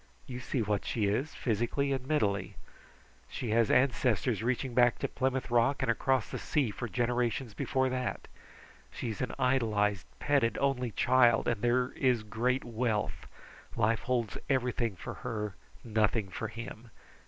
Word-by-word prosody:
You 125 -1 -6
see 125 -1 -1
what 105 -1 0
she 110 -3 -1
is, 125 +10 -1
physically 120 +5 0
and 130 -1 -4
mentally. 100 -11 0 0.7
She 115 - -4
has 115 0 +3
ancestors 125 -3 +2
reaching 125 +2 -1
back 120 0 +4
to - - -1
Plymouth 130 -2 -1
Rock, 120 +4 +3
and 125 - +3
across 130 +1 +1
the - - -5
sea 140 -8 0
for 120 - -5
generations 120 -1 0
before 130 +5 0
that. 125 -2 -3 0.6
She 120 - -5
is 110 - -6
an 125 - -1
idolized, 105 -7 +1
petted 140 -5 +2
only 135 -3 +1
child, 120 0 +4
and 110 -3 0
there 125 +1 +2
is 125 -5 +1
great 120 +5 0
wealth. 115 -3 -2 0.5
Life 115 -1 +2
holds 120 -5 -1
everything 125 -5 0
for - - -7
her, 105 -4 -3 0.3
nothing 110 -2 +1
for 110 +4 -4
him. 115 +1 -8
120 Hz, 155 wpm, -31 LUFS, 110-130 Hz, 0.7 s, back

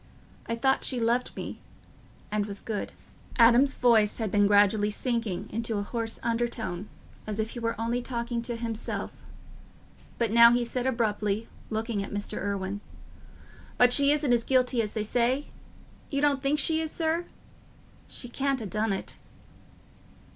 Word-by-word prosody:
I 230 - -1
thought 265 +3 +1
she 255 - +1
loved 235 +2 0
me... - - -6 0.7
and 210 -1 0
was 200 -1 -6
good..." 215 -3 -4 0.4
Adam's 245 +4 +5
voice 225 -4 +3
had 220 -4 -2
been 205 -1 +4
gradually 205 +1 +4
sinking 230 -3 -2
into 230 -1 -2
a 205 - -1
hoarse 225 +1 -3
undertone, 230 -5 -2 0.4
as 210 0 -3
if 220 +1 -1
he 240 - -6
were 230 -1 -2
only 235 +2 -1
talking 235 -1 -3
to 235 0 -3
himself; 230 -1 -5 0.9
but 230 -3 0
now 235 +1 +8
he 240 0 +1
said 250 +2 -2
abruptly, 215 -3 -1 0.2
looking 220 -1 -2
at - - -8
Mr. 205 0 -4
Irwine, 200 0 -3 1.0
"But 245 0 +6
she 280 +1 +6
isn't 295 -4 +2
as 235 -1 +2
guilty 255 -2 +2
as 210 -2 -4
they 215 - -1
say? 245 +6 0 0.6
You 280 - -1
don't 280 -2 +2
think 275 +2 +1
she 320 +1 +3
is, 320 - -2
sir? 330 +1 0 0.8
She 245 - -4
can't 270 +2 -1
ha' 220 - -5
done 215 +2 -1
it." 195 - -6
230 Hz, 160 wpm, -27 LUFS, 210-250 Hz, 1.0 s, now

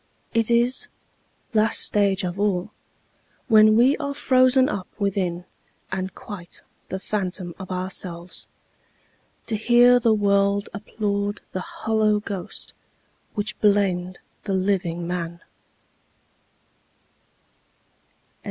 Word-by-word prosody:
It 230 -1 +1
is 240 +2 +2 0.7
last 215 0 +3
stage 200 -1 +2
of 180 +1 -3
all 195 -3 0 0.8
When 215 -2 +6
we 255 +5 +5
are 280 -2 -4
frozen 255 -1 +4
up 200 -10 -4
within, 185 -3 -1 0.5
and 190 0 -3
quite 185 -5 -8 0.3
The 190 - -3
phantom 185 -3 -3
of 190 - -8
ourselves, 180 -1 -3 1.0
To 225 - -2
hear 245 +3 +5
the 225 -2 +3
world 200 -1 +2
applaud 205 0 -3
the 185 - -3
hollow 215 +1 0
ghost 195 -4 -5 0.6
Which 215 +1 -3
blamed 190 -3 +2 0.3
the 200 - -1
living 185 -3 0
man. 170 -1 -4
200 Hz, 100 wpm, -23 LUFS, 185-220 Hz, 1.0 s, When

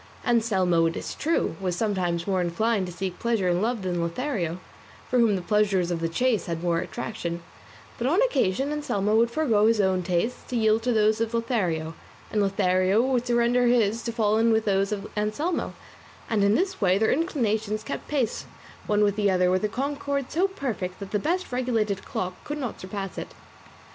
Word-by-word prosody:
Anselmo, 190 -8 +2
it 165 - -3
is - - -5
true, 320 - 0
was 180 -2 -1
somewhat 175 -4 -1
more 190 -2 +1
inclined 195 +3 0
to - - -6
seek 180 0 -5
pleasure 230 -5 0
in 175 +1 +1
love 225 -1 -1
than 175 -2 -1
Lothario, 175 - -2 0.5
for 250 - +1
whom 225 -4 +4
the 185 - -3
pleasures 195 -3 +2
of 170 - -1
the 165 0 -1
chase 225 +2 +1
had 165 0 -3
more 170 -1 +1
attraction; 180 -3 -5 0.6
but 240 - 0
on 335 +8 +3
occasion 270 - +1
Anselmo 215 -9 0
would 230 +1 +4
forego 235 -6 +2
his 225 -1 +3
own 190 -2 +2
tastes 180 +6 -1
to 250 - -4
yield 220 -1 +3
to 250 +2 0
those 215 0 +3
of 230 +1 -1
Lothario, 180 -9 -1 0.4
and 215 - +1
Lothario 190 0 +2
would 250 0 +1
surrender 240 +1 +3
his 230 -2 +2
to 235 - -3
fall 220 -2 +1
in 230 0 +4
with 220 0 +2
those 195 0 +1
of 200 -2 -3
Anselmo, 215 +12 -1 0.5
and 215 -3 +1
in 200 +2 +4
this 380 0 -1
way 185 -1 +4
their 220 +2 +2
inclinations 220 - 0
kept - - -5
pace 265 -7 -1 0.4
one 210 0 +3
with 205 -1 +2
the 205 -1 +2
other 180 -1 +3
with 185 +2 +1
a 210 - +1
concord 280 +2 -2
so 360 +5 +2
perfect 240 - -4
that 200 -1 -8
the 210 - +1
best 355 - -1
regulated 225 -6 0
clock 180 0 -4
could 295 - -4
not 255 -6 -4
surpass 195 -1 -5
it. - - -8
215 Hz, 195 wpm, -26 LUFS, 185-240 Hz, 0.6 s, whom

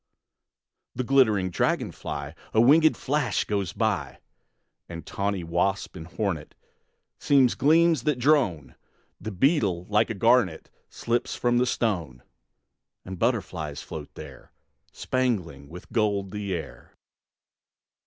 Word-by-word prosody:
The 130 - -2
glittering 110 -8 +3
dragon - - 0
fly, 70 +1 -6 0.2
A - - +5
wingéd 155 +7 +5
flash, 140 -1 -1
goes 100 -4 -2
by; 110 +1 -2 0.7
And 85 -3 -8
tawny 100 -2 -2
wasp 90 +5 -1
and 80 -3 -8
hornet 90 -5 -4 0.6
Seem 140 -2 +4
gleams 160 +4 +3
that 150 +1 0
drone; 120 - +1 0.5
The - - -6
beetle, 100 - +1
like 105 +2 +2
a 110 - -3
garnet, 110 -5 +2 0.2
Slips 120 +1 -2
from 120 0 +1
the 125 - +2
stone; 85 - -2 0.8
And 95 -1 -7
butterflies 90 - -2
float 75 -2 -8
there, - - -11 0.4
Spangling 90 - -2
with 90 +2 -12
gold 100 -4 0
the 105 -1 -4
air. 85 -3 -7
105 Hz, 120 wpm, -26 LUFS, 85-125 Hz, 0.8 s, A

